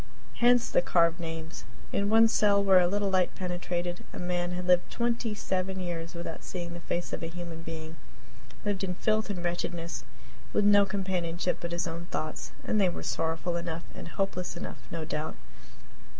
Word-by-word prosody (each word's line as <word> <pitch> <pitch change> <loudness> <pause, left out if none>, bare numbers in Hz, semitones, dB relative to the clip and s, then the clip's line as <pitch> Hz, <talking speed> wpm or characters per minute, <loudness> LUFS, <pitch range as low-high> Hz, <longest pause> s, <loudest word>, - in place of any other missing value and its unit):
Hence 240 0 +5
the - - +3
carved 170 -1 +3
names. 165 -1 -5 0.3
In 200 0 +2
one 225 +1 +7
cell, 205 -2 +4
where 190 -2 +7
a 175 - +4
little 200 +1 +1
light 185 -1 +2
penetrated, 175 -1 -2
a - - -8
man 175 0 -1
had 180 0 -3
lived 180 -1 +4
twenty 235 -2 0
seven 190 -2 -1
years 170 -2 -4
without 170 -1 -5
seeing 175 -2 -5
the 170 - -6
face 175 +1 -3
of - - -2
a 165 - -2
human 170 -1 -6
being 160 0 -6 0.7
lived 200 -2 0
in 180 -1 -1
filth 215 +3 +1
and 180 -4 -3
wretchedness, 170 -1 -2 0.5
with 205 - +3
no 205 -1 +7
companionship 180 -3 -1
but 170 - -3
his 170 0 0
own 170 +1 -5
thoughts, 155 -2 -3
and 215 - +2
they 190 - +5
were - - -5
sorrowful 165 +2 -1
enough 170 -1 -3
and - - -8
hopeless 180 0 -2
enough, - - -6
no 165 -1 -3
doubt. 155 0 -3
175 Hz, 180 wpm, -30 LUFS, 170-195 Hz, 0.7 s, one